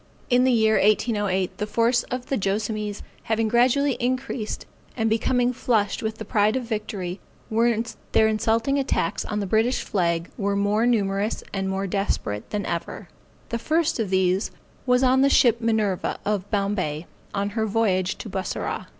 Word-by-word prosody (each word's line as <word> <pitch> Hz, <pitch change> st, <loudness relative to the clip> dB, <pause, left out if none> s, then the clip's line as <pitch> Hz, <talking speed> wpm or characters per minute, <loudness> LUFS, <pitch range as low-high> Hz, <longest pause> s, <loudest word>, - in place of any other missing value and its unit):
In 250 Hz, +1 st, +5 dB
the 260 Hz, -, +4 dB
year 220 Hz, -2 st, +4 dB
1808, 205 Hz, -3 st, +1 dB
the 210 Hz, -, -1 dB
force 230 Hz, +3 st, +2 dB
of 250 Hz, 0 st, -3 dB
the 275 Hz, -, -1 dB
Joassamees 210 Hz, 0 st, -2 dB, 0.2 s
having 225 Hz, 0 st, +1 dB
gradually 250 Hz, +4 st, +3 dB
increased, 255 Hz, -2 st, -2 dB, 0.3 s
and 225 Hz, -2 st, +1 dB
becoming 245 Hz, +2 st, +2 dB
flushed 220 Hz, -4 st, 0 dB
with 220 Hz, -1 st, -3 dB
the 220 Hz, -, -7 dB
pride 210 Hz, +1 st, +2 dB
of 260 Hz, -, -1 dB
victory, 210 Hz, -5 st, -4 dB, 0.3 s
their 230 Hz, -1 st, +1 dB
insulting 225 Hz, +5 st, +1 dB
attacks 260 Hz, -10 st, 0 dB
on 210 Hz, -1 st, -3 dB
the -, -, -2 dB
British 220 Hz, +6 st, +1 dB
flag 170 Hz, -3 st, -1 dB
were 200 Hz, 0 st, 0 dB
more 205 Hz, +3 st, +2 dB
numerous 205 Hz, -2 st, 0 dB
and 195 Hz, -1 st, -1 dB
more 190 Hz, +1 st, -1 dB
desperate 180 Hz, -, -2 dB
than 210 Hz, -1 st, -2 dB
ever. 170 Hz, -, -4 dB, 0.4 s
The 235 Hz, -, -2 dB
first 320 Hz, +2 st, +1 dB
of 215 Hz, -4 st, -1 dB
these 190 Hz, +1 st, +2 dB, 0.4 s
was 250 Hz, +1 st, +4 dB
on 260 Hz, +1 st, +4 dB
the 275 Hz, -, +5 dB
ship 235 Hz, -3 st, +4 dB
Minerva, 220 Hz, -5 st, 0 dB
of 205 Hz, -1 st, -1 dB
Bombay, 195 Hz, -7 st, -1 dB, 0.3 s
on 200 Hz, 0 st, -1 dB
her 220 Hz, +1 st, -1 dB
voyage 195 Hz, -4 st, +1 dB
to -, -, -7 dB
Bussorah. 190 Hz, -1 st, -3 dB
215 Hz, 160 wpm, -24 LUFS, 200-235 Hz, 0.4 s, In